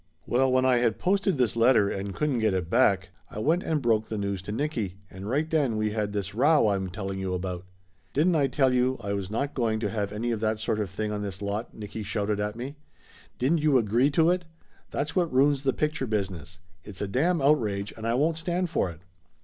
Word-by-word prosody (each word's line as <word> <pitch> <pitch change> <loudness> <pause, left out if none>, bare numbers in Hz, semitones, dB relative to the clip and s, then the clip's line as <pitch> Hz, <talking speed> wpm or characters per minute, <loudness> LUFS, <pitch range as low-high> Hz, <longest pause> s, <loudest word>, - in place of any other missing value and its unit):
Well, 130 +2 +2
when 130 0 +3
I 130 -1 +4
had 115 -3 +1
posted 195 -2 +1
this 125 -4 +1
letter 115 -3 +4
and 100 0 -4
couldn't 150 -5 0
get 110 -3 +2
it 90 -2 -3
back, 100 -5 +3 0.2
I - - -10
went 160 +11 +2
and 155 -6 -1
broke 110 -2 +2
the 110 - -3
news 100 -2 -2
to 100 - -6
Nicky, 115 - -2 0.2
and 95 +3 -7
right 145 +6 +1
then 145 -8 +1
we 110 0 0
had 105 -1 -2
this 100 -1 -3
row 145 +6 +4
I 105 -2 +3
am 95 -1 -3
telling 95 +1 -5
you 95 -1 -2
about 90 0 -4 0.5
"Didn't 165 +5 +2
I 145 -3 +3
tell 130 0 +2
you 125 +1 +2
I 100 -3 -3
was 100 -2 -3
not 140 +7 -2
going 115 -4 0
to - - -1
have 105 -3 -2
any 115 +3 -2
of 115 - -1
that 110 0 0
sort 110 0 -1
of 105 -3 -2
thing 105 +2 -3
on 105 -1 -3
this 100 -2 -5
lot?" 105 +3 -4
Nicky 105 0 -7
shouted 105 0 -1
at 105 +1 -2
me. 130 +5 -6 0.6
"Didn't 145 +7 +2
you 150 -3 +4
agree 120 +4 +3
to 160 +3 +3
it? 180 0 0 0.5
That's 145 +2 -3
what 175 -3 +1
ruins 135 +1 +3
the 135 -1 +2
picture 150 -1 -1
business. 95 -6 -3 0.3
It's 100 -3 -10
a 100 - -1
damn 160 - +1
outrage, 110 -9 +1
and 110 0 -5
I 115 - +1
won't 155 +5 +1
stand 175 +1 -1
for 120 - +1
it!" 80 -1 -11
115 Hz, 235 wpm, -27 LUFS, 100-140 Hz, 0.6 s, I